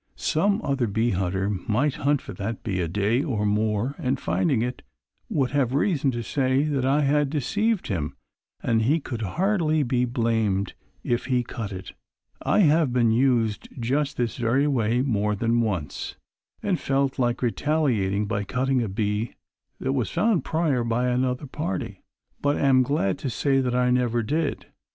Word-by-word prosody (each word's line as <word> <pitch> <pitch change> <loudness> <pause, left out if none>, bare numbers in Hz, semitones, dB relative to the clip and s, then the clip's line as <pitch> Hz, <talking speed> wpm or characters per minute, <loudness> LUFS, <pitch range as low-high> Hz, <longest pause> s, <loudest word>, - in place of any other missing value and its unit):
Some 200 +7 +1
other 135 -4 0
bee 110 +3 +1
hunter 95 +1 -1
might 105 +8 0
hunt 145 0 +1
for - - -8
that 105 +3 -5
bee 95 -5 -2
a 85 - -1
day 105 +8 +1
or 120 -9 -1
more 105 +4 0
and 130 +1 -1
finding 135 -9 +1
it 125 +1 -4 0.5
would 130 -4 0
have 135 -3 +1
reason 145 -3 +2
to 120 -2 -2
say 130 +2 +1
that 145 -4 0
I 140 +3 +3
had 145 0 +2
deceived 205 - 0
him 80 -7 -3 0.5
and 115 -1 +2
he 145 +9 +2
could 120 -6 -6
hardly 155 - +1
be 125 -1 +1
blamed 115 -5 0 0.3
if 120 0 -1
he 125 -2 +1
cut 115 -3 -6
it. 95 -1 -7 0.5
I - - +3
have 155 -4 +4
been 120 -2 +3
used 115 -3 +1
just 140 +5 0
this 120 -2 -1
very 125 +4 +2
way 120 -3 +1
more 105 -5 0
than 115 +3 +1
once, 95 -11 -3 0.5
and 190 -4 0
felt 135 0 0
like 120 0 0
retaliating 115 -7 +1
by 105 -1 -2
cutting 130 +4 0
a 115 - -2
bee 105 +3 -2 0.4
that 130 - -1
was 125 -6 0
found 215 -5 +1
prior 155 -7 0
by 120 +2 0
another 125 +2 0
party. 135 - -4 0.4
But 145 0 +1
am 135 -2 +4
glad 125 -8 0
to 135 - -3
say 135 +3 +1
that 125 -1 -1
I 125 0 +2
never 120 -2 +1
did. 150 +6 -1
125 Hz, 170 wpm, -25 LUFS, 110-140 Hz, 0.5 s, have